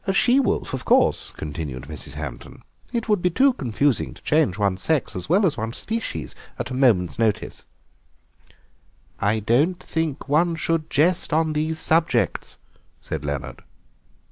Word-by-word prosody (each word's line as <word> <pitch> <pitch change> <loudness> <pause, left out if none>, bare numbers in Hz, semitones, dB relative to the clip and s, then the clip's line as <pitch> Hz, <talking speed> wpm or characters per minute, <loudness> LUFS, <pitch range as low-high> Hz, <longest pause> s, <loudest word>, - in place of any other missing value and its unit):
"A 195 - +2
she 245 +7 +4
wolf, 275 - 0
of - - -3
course," - - +3
continued 75 -4 -5
Mrs. 75 -2 -7
Hampton; 70 -5 -8 0.3
"it 235 -2 -2
would 210 -4 +2
be 180 - +3
too 265 +9 +4
confusing 135 - 0
to - - -16
change 150 - +2
one's 100 -2 0
sex 155 -5 0
as 90 - -5
well 195 +5 +4
as 165 - +1
one's 115 +1 -3
species 220 - -4 0.2
at - - -4
a - - -3
moment's 115 -8 +2
notice." 110 -3 -1 1.5
"I 105 +2 +1
don't 140 - +2
think 160 -4 -3
one 165 +4 +2
should 160 0 -1
jest 165 +6 +2
on 160 0 +2
these 155 +1 -1
subjects," 160 +1 +1 0.4
said 80 -2 -5
Leonard. 70 -3 -4
145 Hz, 155 wpm, -23 LUFS, -, 1.5 s, she